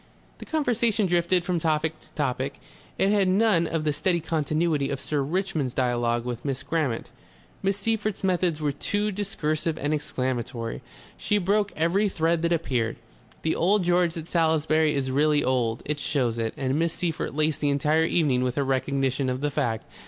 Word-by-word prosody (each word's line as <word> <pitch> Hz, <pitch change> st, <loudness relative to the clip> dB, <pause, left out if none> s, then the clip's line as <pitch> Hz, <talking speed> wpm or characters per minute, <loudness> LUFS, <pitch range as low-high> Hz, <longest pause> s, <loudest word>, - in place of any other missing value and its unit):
The -, -, -10 dB
conversation 235 Hz, -8 st, +1 dB
drifted 175 Hz, 0 st, +2 dB
from 180 Hz, -2 st, 0 dB
topic 160 Hz, 0 st, 0 dB
to -, -, -17 dB
topic. 135 Hz, -2 st, -2 dB, 0.4 s
It 195 Hz, -, +3 dB
had 200 Hz, -2 st, +3 dB
none 190 Hz, -3 st, +3 dB
of 160 Hz, -1 st, -2 dB
the 150 Hz, -1 st, +1 dB
steady 175 Hz, +3 st, +1 dB
continuity 155 Hz, -2 st, 0 dB
of 140 Hz, -, -3 dB
Sir 150 Hz, -2 st, -1 dB
Richmond's 155 Hz, -4 st, -1 dB
duologue 120 Hz, -2 st, +1 dB
with 120 Hz, -1 st, -4 dB
Miss 135 Hz, -2 st, -3 dB
Grammont. 140 Hz, -5 st, -2 dB, 0.5 s
Miss 195 Hz, 0 st, +1 dB
Seyffert's 215 Hz, -1 st, -1 dB
methods 180 Hz, -4 st, +1 dB
were 150 Hz, -2 st, 0 dB
too 205 Hz, +9 st, -1 dB
discursive 165 Hz, -6 st, -2 dB
and 145 Hz, +1 st, -1 dB
exclamatory. 125 Hz, -5 st, -3 dB, 0.4 s
She 210 Hz, -, +1 dB
broke 205 Hz, +2 st, +1 dB
every 185 Hz, +6 st, +2 dB
thread 165 Hz, -2 st, +1 dB
that 170 Hz, 0 st, 0 dB
appeared. 130 Hz, -9 st, 0 dB, 0.5 s
The 160 Hz, -, +1 dB
Old 195 Hz, +3 st, +3 dB
George 175 Hz, -1 st, +2 dB
at 165 Hz, 0 st, -6 dB
Salisbury 160 Hz, -2 st, +2 dB
is 135 Hz, -2 st, -1 dB
really 150 Hz, +2 st, +3 dB
old; 120 Hz, -3 st, 0 dB
it 150 Hz, 0 st, -2 dB
shows 125 Hz, -6 st, 0 dB
it, 115 Hz, -1 st, -2 dB
and 135 Hz, +2 st, 0 dB
Miss 165 Hz, 0 st, +1 dB
Seyffert 165 Hz, -5 st, -3 dB
laced 155 Hz, 0 st, +1 dB
the 145 Hz, -, +1 dB
entire 150 Hz, +3 st, +2 dB
evening 145 Hz, -7 st, +2 dB
with 125 Hz, -1 st, -1 dB
her 140 Hz, -, +1 dB
recognition 135 Hz, 0 st, 0 dB
of 130 Hz, +1 st, -2 dB
the 145 Hz, 0 st, 0 dB
fact. 120 Hz, -6 st, -1 dB
155 Hz, 175 wpm, -26 LUFS, 135-175 Hz, 0.5 s, It